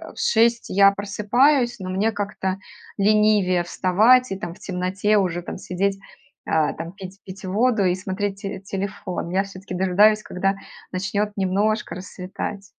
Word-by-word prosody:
в - - -10
6 230 +1 +2
я 195 +1 +6
просыпаюсь, 240 +6 +2
но 185 -1 -6
мне 205 +4 +1
как-то 200 -2 -3 0.4
ленивее 205 -3 +3
вставать 215 +9 +3
и, 195 - -2
там, 175 -4 -6
в - - -19
темноте 190 +3 0
уже, 175 -2 -1
там, - - -6
сидеть, 195 +2 -1 0.5
а, 155 -2 +2
там, 165 +1 -7
пить 195 0 -10
пить 190 0 -10
воду 215 +2 +2
и 180 - +3
смотреть 195 +1 -4
те 195 -2 -5
телефон. 190 -3 -4
Я 190 +2 +1
все-таки 195 -1 -8
дожидаюсь, 205 +4 +4
когда 195 +2 -1 0.4
начнет 200 +3 -1
немножко 205 +3 0
рассветать. 190 +2 -6
195 Hz, 150 wpm, -23 LUFS, 185-210 Hz, 0.5 s, я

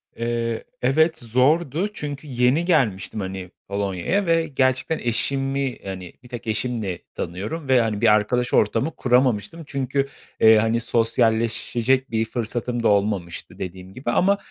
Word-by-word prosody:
Eee, 115 -1 -2 0.2
evet 160 +5 +3
zordu. 140 - +1
Çünkü 145 -3 -6
yeni 125 +6 +2
gelmiştim, 110 - +1
hani, 95 -1 -5 0.2
Polonya'ya 100 - -1
ve 165 -1 +2
gerçekten 130 +2 +1
eşimi, 135 +2 -1
hani, 95 -2 -6
bir - - -13
tek 120 -2 -7
eşimi 110 -4 -2 0.2
tanıyorum 105 - -4
ve, 130 -2 +5
hani, 105 -2 -1
bir - - +4
arkadaş 120 +4 +1
ortamı 130 +9 +2
kuramamıştım. 125 +4 +1
Çünkü, 135 0 -1 0.3
eee, 110 0 +7
hani, 115 +2 +2
sosyalleşecek 115 +2 +1
bir 110 0 +1
fırsatım 120 +1 -3
da - - +4
olmamıştı 100 -4 -1
dediğim 95 +1 -7
gibi 130 - -3
ama, 200 +2 +3
120 Hz, 135 wpm, -23 LUFS, 105-135 Hz, 0.3 s, eee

